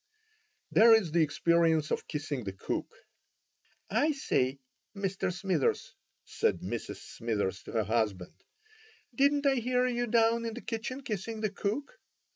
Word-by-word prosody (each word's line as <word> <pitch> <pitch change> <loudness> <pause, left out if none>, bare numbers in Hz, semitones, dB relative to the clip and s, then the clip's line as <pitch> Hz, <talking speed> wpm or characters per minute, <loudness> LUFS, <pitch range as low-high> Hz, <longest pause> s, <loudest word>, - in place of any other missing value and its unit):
There 225 +1 +8
is 195 -8 +1
the 170 +1 +3
experience 160 0 +2
of - - -2
kissing 145 -4 -3
the 95 -2 -5
cook. 95 - -4 1.0
"I 290 +9 +2
say, 135 - 0 0.4
Mr. 195 -2 -1
Smithers," 180 -4 -1 0.3
said - - 0
Mrs. - - -4
Smithers 105 -4 -3
to - - -9
her 110 -2 +2
husband, 105 -4 -1 0.8
"didn't 285 +3 +2
I 275 -1 +4
hear 250 +1 +1
you 245 -1 0
down 230 0 +3
in 225 -1 -4
the 245 - -7
kitchen 245 +3 -4
kissing 215 0 -4
the 215 -2 0
cook?" 275 - -3
200 Hz, 140 wpm, -30 LUFS, 145-240 Hz, 1.0 s, There